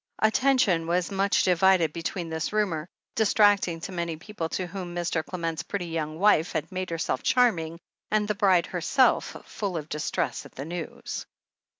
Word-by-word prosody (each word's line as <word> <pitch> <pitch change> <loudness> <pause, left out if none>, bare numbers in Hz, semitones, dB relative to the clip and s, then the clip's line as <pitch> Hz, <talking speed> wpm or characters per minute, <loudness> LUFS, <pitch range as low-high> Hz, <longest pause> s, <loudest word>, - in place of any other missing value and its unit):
Attention 220 -7 +3
was 175 +1 0
much 195 0 +2
divided 180 -3 +4
between 170 +1 -3
this 160 -1 -2
rumour, 185 -7 -1 0.2
distracting 205 -5 +3
to 195 - -6
many 170 -3 -3
people 175 -1 -5
to 185 - -2
whom 180 -1 -6
Mr. 170 -2 -1
Clement's 165 -2 -3
pretty 180 +1 -4
young 160 -2 -3
wife 180 -3 +3
had 160 0 -3
made 185 0 -3
herself 160 -6 -2
charming, 170 -10 +2 0.3
and 210 -1 +1
the 210 - +1
bride 190 -4 +3
herself, 220 - +2
full 195 -5 -3
of 155 -1 -6
distress 150 0 -2
at - - -15
the 135 - -5
news. 170 0 -6
175 Hz, 165 wpm, -27 LUFS, 165-200 Hz, 0.3 s, divided